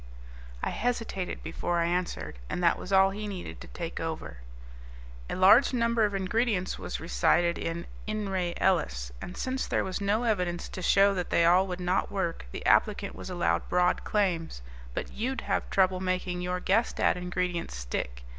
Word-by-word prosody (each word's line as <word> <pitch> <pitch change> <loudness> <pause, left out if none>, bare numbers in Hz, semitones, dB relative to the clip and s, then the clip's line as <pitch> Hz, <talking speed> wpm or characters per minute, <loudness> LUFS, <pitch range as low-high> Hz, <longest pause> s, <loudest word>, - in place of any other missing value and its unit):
I - - 0
hesitated 225 -6 -2
before 170 +2 -2
I 170 - +2
answered, 170 - -2
and 180 - -2
that 170 - +4
was 185 - -7
all 190 0 +5
he 210 +2 -5
needed 190 -3 -7
to - - -9
take 170 -1 -5
over. 160 - -4 0.9
"A - - -2
large 210 +9 +6
number 230 -2 +2
of 205 -1 -2
ingredients 195 0 0
was - - -4
recited 170 +1 +2
in 165 +1 -3 0.2
In 215 -1 -2
re 180 -2 -1
Ellis, - - +1
and 180 - -7
since 260 +1 -2
there - - +1
was 190 +1 -3
no 205 +4 +1
evidence 180 -6 0
to 185 - -7
show 200 +2 +5
that 180 -2 -3
they 170 - +3
all 180 +3 +5
would 180 -1 -4
not 180 +3 0
work, 175 - -2
the - - -7
applicant - - +3
was - - -8
allowed 85 0 0
broad 180 0 +2
claims. 170 - -1 0.3
But - - -3
you'd 255 +5 -2
have - - -1
trouble 185 -1 +3
making 185 -1 -1
your 180 0 -2
guessed 215 +6 +1
at - - +3
ingredients 180 - -2
stick. - - -4
180 Hz, 180 wpm, -29 LUFS, 170-200 Hz, 0.9 s, large